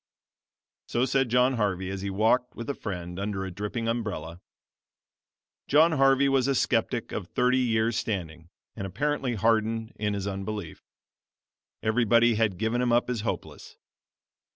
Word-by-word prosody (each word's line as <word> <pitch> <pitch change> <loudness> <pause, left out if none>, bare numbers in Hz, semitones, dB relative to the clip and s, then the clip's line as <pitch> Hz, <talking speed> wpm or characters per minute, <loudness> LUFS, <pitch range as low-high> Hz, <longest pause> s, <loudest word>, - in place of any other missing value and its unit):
So 120 +2 +1
said 135 -1 +1
John 125 +2 +3
Harvey 95 -3 -1
as 95 -1 -5
he 100 - -3
walked 110 +5 +1
with 115 - -7
a - - -4
friend 90 -6 -6
under 100 -1 -3
a 95 - -5
dripping 105 +5 -4
umbrella. 105 -7 -3 1.3
John 155 +4 +5
Harvey 135 -1 +4
was 135 -1 +2
a 140 - +1
skeptic 120 -1 0
of 95 - -4
thirty 125 +3 +2
years 115 -2 +1
standing 85 -5 -4 0.3
and 100 -3 -4
apparently 135 +5 -1
hardened 110 +1 +1
in 105 -1 -1
his 100 -1 -3
unbelief. 100 -3 -5 1.0
Everybody 115 +1 +4
had 105 -4 +1
given 115 +4 0
him 125 -1 +1
up 120 +1 +2
as 120 -4 -2
hopeless. 110 - -6
110 Hz, 150 wpm, -27 LUFS, 100-125 Hz, 1.3 s, John